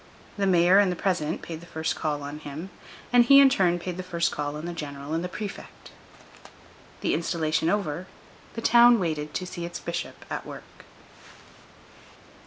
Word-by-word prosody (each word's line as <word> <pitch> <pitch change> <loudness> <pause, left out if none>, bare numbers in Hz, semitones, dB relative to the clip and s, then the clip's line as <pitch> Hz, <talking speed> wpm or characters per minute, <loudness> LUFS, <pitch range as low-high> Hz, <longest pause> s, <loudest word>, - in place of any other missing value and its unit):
The 200 -1 0
mayor 180 +1 +5
and 200 -3 +3
the - - -2
president 170 -4 -1
paid 165 -2 -6
the 170 - -13
first 160 0 -2
call 150 -2 -2
on 145 +1 -6
him, 155 +5 -8 0.4
and 245 -1 +7
he, 275 +3 +7
in 275 -1 +8
turn, 180 -8 +2
paid 175 0 -5
the - - -3
first 170 -2 -1
call 145 0 -3
on 155 +2 -6
the 175 - -4
general 145 -2 -6
and 165 +1 -1
the 180 - -4
prefect. 205 +1 -8 1.1
The - - 0
installation 160 -1 0
over, 180 -3 -2 0.5
the 230 - -4
town 240 0 +7
waited 155 -4 -3
to 185 - -2
see 175 -1 -7
its 170 0 -5
bishop 170 0 -6
at - - -4
work. - - -12
170 Hz, 180 wpm, -26 LUFS, 155-190 Hz, 1.1 s, in